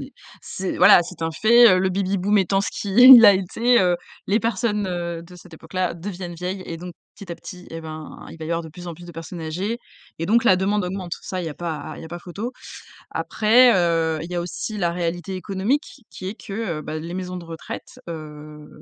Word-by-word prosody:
est - - -9 0.3
c'est 190 0 -4
voilà. - - +7
C'est 175 0 -9
un 165 - 0
fait, 235 +7 +6
heu, - - +2
le 190 +1 +1
Baby-boom 195 +2 0
étant 195 0 +2
ce 200 - -2
qui 205 - -5
est, 250 - +10
il 245 -3 +12
a 205 - +10
été, 225 +6 +2
heu, 180 -2 +2 0.3
les 205 - +2
personnes, 210 -2 -1
heu, 170 -2 -4
de 180 +1 -14
cette 175 -1 -14
époque-là 175 +3 -3
deviennent 175 0 -7
vieilles 180 +3 -5
et 165 - -5
donc 175 +2 -8 0.2
petit 190 -4 -8
à - - -5
petit 180 +1 -11
eh 165 - -6
ben, 155 -1 -9
il - - -10
va 160 - -6
y 160 - -5
avoir 170 0 -1
de 160 - -9
plus 175 +3 -11
en - - -5
plus 175 +2 -13
de 175 - -10
personnes 165 +2 -8
âgées 185 +9 -3 0.4
et 165 - -3
donc 230 +5 +3
la 185 - +6
demande 200 +1 0
augmente. 180 -1 -5
Ça, 185 - -4
il 175 - -4
y - - -2
a 150 - -7
pas 165 -2 -5
il - - -10
y - - -8
a - - -9
pas 175 - -6
photo. 200 +8 -6 0.6
Après, 240 +3 +4
heu, 165 -3 +1
il 170 - -8
y - - -4
a 175 - 0
aussi 180 +5 -5
la 175 -4 0
réalité 175 +1 -3
économique 205 - -2
qui 185 - -8
est 200 - -5
que, 220 - -11 0.3
heu, - - -7
bah 155 +1 -5
les 165 +2 -7
maisons 180 -1 -5
de 175 - -9
retraite, 165 -1 -9
heu, 150 -2 -9
180 Hz, 245 wpm, -22 LUFS, 165-200 Hz, 0.6 s, il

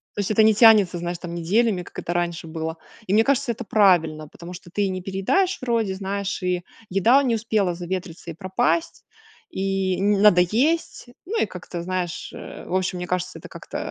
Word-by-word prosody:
То 205 - -1
есть 200 - -2
это 215 - +4
не 220 0 +6
тянется, 210 -5 +6
знаешь, 175 0 -4
там 175 -1 -6
неделями, 190 +3 +1
как - - -10
это 175 - -4
раньше 175 -1 -2
было. 160 0 -5 0.3
И 190 - 0
мне 220 +2 +5
кажется, 280 -1 +1
это 235 +1 -6
правильно, 175 -8 +3
потому 170 +4 -11
что 175 -1 -12
ты 200 0 0
не 185 0 -4
переедаешь 200 - 0
вроде, 230 -5 0
знаешь, 195 +1 -3
и 180 -1 -1 0.3
еда 230 +9 +4
не 235 -3 +1
успела 210 -5 0
заветриться 175 -1 -5
и - - -8
пропасть, 240 - -1 0.5
и 195 - -1
не 205 +1 +2
надо 200 -3 +6
есть. 260 - 0 0.2
Ну 445 +5 -2
и - - +1
как-то 180 -3 -7
знаешь, 185 0 -3
э, - - -9
в - - -6
общем, 185 -1 -1
мне 180 - -4
кажется, 180 0 -3
это - - -11
как-то, - - -8
190 Hz, 200 wpm, -23 LUFS, 175-220 Hz, 0.5 s, не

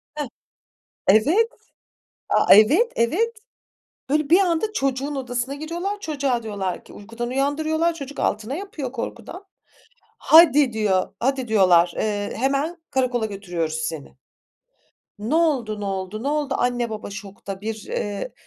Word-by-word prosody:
Heh. 295 -2 -3 0.8
Evet. 310 - +4 0.8
A, - - +6
evet, 280 - +6
evet. 435 - +1 0.7
Böyle, 300 0 +1
bir 345 +4 +6
anda 390 +3 +1
çocuğun 275 -3 -1
odasına 250 0 -3
giriyorlar, 345 +7 -4
çocuğa 275 - -1
diyorlar 200 -4 -4
ki - - -15
uykudan 230 +3 -6
uyandırıyorlar, 310 +5 0
çocuk 285 -3 -8
altına 220 +6 -1
yapıyor 315 -8 -5
korkudan. 270 - -7 0.7
"Hadi." 295 -5 +6
diyor, 200 -4 0
"Hadi." 260 -1 0
diyorlar, 180 -5 +4
eee, 205 -1 -2
"Hemen 275 +7 0
karakola 250 -3 0
götürüyoruz 175 -6 -4
seni. 160 -3 -5 1.0
Ne 220 +8 -2
oldu, 265 -11 +1
ne - - -4
oldu, 195 +2 -4
ne 275 - -1
oldu?" 290 -2 -1
anne, 245 -1 0
baba 210 -2 -6
şokta. 200 -1 -8
Bir, 220 +1 -3
eee, 205 - -3
250 Hz, 130 wpm, -23 LUFS, 210-305 Hz, 1.0 s, A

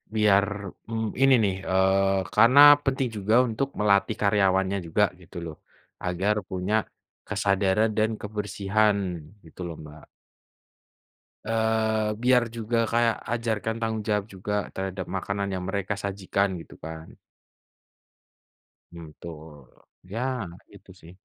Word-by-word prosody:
Biar, 100 -2 +4 0.4
mmm, 110 -1 -2 0.2
ini 135 0 +6
nih 95 -2 +1 0.2
eee 95 +1 +3 0.2
karena 115 +6 +6 0.3
penting 135 -1 0
juga 105 +3 +1
untuk 115 +4 -1
melatih 105 +1 +3
karyawannya 95 -1 +2
juga 95 +6 +2 0.2
gitu 90 +1 -12
loh, 80 -2 -7 0.5
agar 95 +4 0
punya 95 +3 -1 0.5
kesadaran 100 +2 +1
dan 110 +1 +2
kebersihan 105 0 0 0.5
gitu 80 - -12
loh 85 - -6
Mbak. 75 0 -13 1.4
Eee, 110 -1 +1
biar 125 0 +4
juga 115 0 -2
kaya 115 0 +3 0.2
ajarkan 110 -2 -2
tanggung 110 -1 -2
jawab 105 -2 0
juga 100 +1 -5 0.2
terhadap 95 -1 -4
makanan 100 +1 -3
yang 90 -1 -3
mereka 100 0 -2
sajikan 100 -1 -1
gitu - - -14
kan. 80 0 -9 1.7
Hmm 85 -1 -10 0.2
tul, 75 -4 -11 0.4
ya 110 - -3 0.3
nah 85 - -14 0.2
itu 100 -1 -16
sih. 80 - -13
100 Hz, 120 wpm, -26 LUFS, 95-110 Hz, 1.7 s, ini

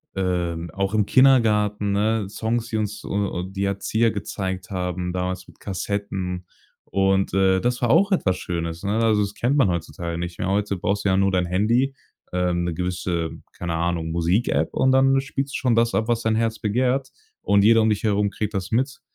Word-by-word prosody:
äh, 90 -3 -1 0.2
auch 100 +2 -1
im 105 -2 +3
Kindergarten, 105 -6 +3
ne, 105 +1 +1
Songs, 115 +3 -2
die 110 - -1
uns 105 0 -3
u - - -7
u 100 -3 -1
die 95 +1 -3
Erzieher 110 +4 +1
gezeigt 95 -3 -4
haben 90 -1 -3
damals 90 0 -3
mit - - -18
Kassetten. 95 -2 -4 0.4
Und, 95 0 +1
äh, 95 -1 +3
das 125 +4 -1
war 120 - +1
auch 195 - +4
etwas 95 - +1
Schönes, 85 -1 -4
ne? 100 +1 -1
Also, 110 -2 +3
das 100 -1 -2
kennt 130 +7 0
man 135 -8 +4
heutzutage 85 0 -3
nicht 85 0 -5
mehr. 90 - -1
Heute 100 0 0
brauchst 100 +2 -1
du 100 - +1
ja 95 - +3
nur 95 0 +3
dein 90 -1 +2
Handy, 115 +9 +1 0.4
ähm, 90 -1 0
'ne 85 -1 -2
gewisse, 90 -1 -2 0.3
keine 85 -2 -3
Ahnung, 85 -1 -1
Musikapp 85 +7 +1
und 130 - +3
dann 135 0 +4
spielst 135 0 -4
du - - -1
schon 125 -3 +1
das 115 0 +2
ab, 110 - 0
was 120 -1 +1
dein 110 -1 +1
Herz 115 0 0
begehrt 125 +5 0 0.3
und 100 0 +3
jeder 115 0 +6
um 110 - +3
dich 105 -2 0
herum 105 -1 +2
kriegt 105 +1 -4
das 95 -2 -3
mit. 130 +4 0
100 Hz, 200 wpm, -23 LUFS, 90-115 Hz, 0.4 s, jeder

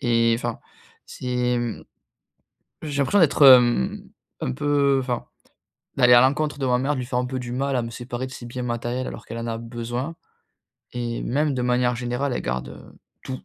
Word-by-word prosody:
Et 115 -1 +3
enfin, 120 -1 -4 0.5
c'est 125 -1 -1
mmh 120 -2 -4 1.0
j'ai 145 -3 -4
l'impression 200 +9 +3
d'être 155 -3 +3
hem, 120 - +6 0.4
un 65 - -2
peu 140 - +2
enfin, 125 -2 -3 0.7
d'aller 125 -2 +6
à 120 - +8
l'encontre 145 +2 +1
de 135 - -2
ma 125 -1 +2
mère, 135 +4 0
de - - -4
lui 125 - -5
faire 125 0 -1
un 125 - -1
peu 130 +1 -4
du 120 -1 -6
mal 135 +2 -1
à 125 - 0
me 115 - -5
séparer 120 +2 -5
de 130 - -10
ses 120 - -9
biens 125 +1 -5
matériels, 120 +1 -3
alors - - -8
qu'elle 115 - -7
en 115 - -4
a 115 -1 -3
besoin. 120 +6 -5 0.8
Et 120 -1 -3
même 145 +3 0
de 130 - -2
manière 125 0 +1
générale, 125 +3 -2
elle - - -2
garde 65 0 -6 0.3
tout. 130 0 -5
125 Hz, 195 wpm, -23 LUFS, 120-135 Hz, 1.0 s, à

